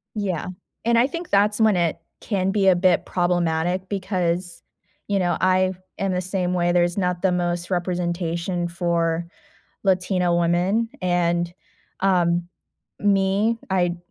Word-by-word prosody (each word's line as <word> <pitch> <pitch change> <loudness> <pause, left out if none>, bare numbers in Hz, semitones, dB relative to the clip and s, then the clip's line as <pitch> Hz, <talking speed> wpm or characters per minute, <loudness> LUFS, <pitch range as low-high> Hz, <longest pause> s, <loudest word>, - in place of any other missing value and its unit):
Yeah, 190 -6 -2 0.4
and 235 0 +3
I 245 - +5
think 335 +4 -6
that's 205 +2 +3
when 215 -4 +4
it 170 -2 +1 0.2
can 195 -3 -1
be 195 -1 +2
a 180 - +6
bit 185 0 +2
problematic, 175 0 0
because, 180 -3 -2 0.4
you 200 -1 0
know, 175 -1 +1
I 185 0 +3 0.3
am 195 -1 0
the 180 - 0
same 185 -1 -2
way, 175 0 +1
there's 175 +2 +2
not 180 -2 -1
the 190 -2 +3
most 175 0 -1
representation 175 -1 -2
for 170 -1 -1 0.6
Latino 180 -2 +2
women, 180 +7 +1
and, 175 -1 0 0.5
um, 175 -2 +2 0.5
me, 200 +3 +2
I'd 175 -2 +1
180 Hz, 135 wpm, -23 LUFS, 175-195 Hz, 0.6 s, a